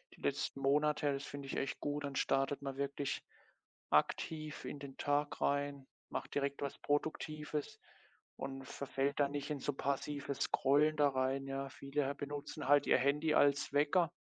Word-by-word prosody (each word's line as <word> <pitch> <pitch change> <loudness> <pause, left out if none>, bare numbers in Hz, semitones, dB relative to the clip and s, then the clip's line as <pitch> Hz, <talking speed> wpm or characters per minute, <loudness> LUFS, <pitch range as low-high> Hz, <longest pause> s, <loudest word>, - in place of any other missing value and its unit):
die - - -20
letzten 135 - -1
Monate. 145 +1 +3
Das 135 +1 -3
finde 140 +1 -7
ich - - -4
echt 135 - -2
gut. 145 0 -2
Dann 140 -1 -4
startet 135 +1 +1
man 135 -1 -4
wirklich 140 0 -2 0.7
aktiv 155 -1 +1
in 145 - -5
den 140 -1 -9
Tag 145 +1 0
rein, 140 -1 0 0.2
macht - - -4
direkt 140 0 0
was 140 - -4
Produktives 150 0 -2 0.6
und 135 0 -5
verfällt 140 +1 -2
da 140 -1 +4
nicht 145 +1 -3
in 145 - -2
so 145 - -1
passives 140 0 -2
Scrollen 150 +4 +3
da 145 -1 +5
rein, 135 +1 0
ja. 135 0 -3
Viele 140 0 -2
benutzen 145 0 -5
halt 145 0 +5
ihr - - +6
Handy 150 +4 +2
als 140 -1 +4
Wecker. 155 +4 +3
140 Hz, 165 wpm, -36 LUFS, 135-145 Hz, 0.7 s, ihr